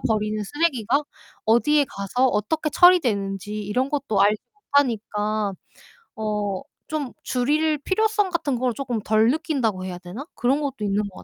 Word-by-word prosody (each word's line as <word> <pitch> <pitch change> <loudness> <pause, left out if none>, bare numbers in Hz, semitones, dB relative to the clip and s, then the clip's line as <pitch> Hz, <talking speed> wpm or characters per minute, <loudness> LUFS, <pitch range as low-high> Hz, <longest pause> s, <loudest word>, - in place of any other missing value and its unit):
버리는 215 -1 0
쓰레기가 285 -1 +1 0.4
어디에 285 +6 +4
가서 200 +7 0
어떻게 300 +10 -1
처리되는지 210 - +3
이런 250 +7 -1
것도 275 -9 0
알지 210 +1 +3
못하니까 215 - 0 0.6
어 210 -3 -2 0.3
좀 295 -5 -3
줄일 300 +5 +1
필요성 415 +2 +1
같은 290 -6 -1
걸 250 -2 +1
조금 250 -5 -2
덜 220 +2 +3
느낀다고 250 - -1
해야 180 -1 -6
되나? 185 +10 -8
그런 265 +4 +1
것도 275 -2 -3
있는 205 +1 +1
것 185 - -16
240 Hz, 310 characters per minute, -23 LUFS, 210-295 Hz, 0.6 s, 어디에